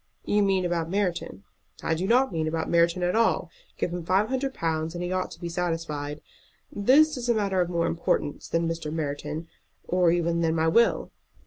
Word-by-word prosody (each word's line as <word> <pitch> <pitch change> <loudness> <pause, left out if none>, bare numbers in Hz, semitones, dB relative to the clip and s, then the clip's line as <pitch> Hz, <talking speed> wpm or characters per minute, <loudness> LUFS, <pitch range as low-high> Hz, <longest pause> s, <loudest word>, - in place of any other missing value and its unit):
"You 210 - +2
mean 195 -2 +2
about 170 -2 -1
Merton?" 180 - -2 0.4
"I - - +1
don't 230 +10 +2
mean 160 -2 -1
about 160 +1 -2
Merton 170 +1 +3
at 180 +2 +1
all. 225 -6 +2 0.3
Give 175 - -2
him 175 -1 -4
five 190 +6 +2
hundred 265 +1 -2
pounds, 160 0 -2
and 175 - -3
he 175 - -3
ought 185 0 -1
to - - -12
be 175 - -4
satisfied. 165 -4 -3 0.5
This 280 +8 +4
is 245 -1 -4
a 235 - +4
matter 195 -3 +1
of 175 - 0
more 170 -1 0
importance 155 -3 -1
than 165 0 0
Mr. 165 -2 -3
Merton 150 +1 -4 0.4
or 180 -1 +3
even 170 0 +1
than 165 -1 +1
my 160 0 +2
will." 230 +8 +3
170 Hz, 195 wpm, -26 LUFS, 165-195 Hz, 0.5 s, This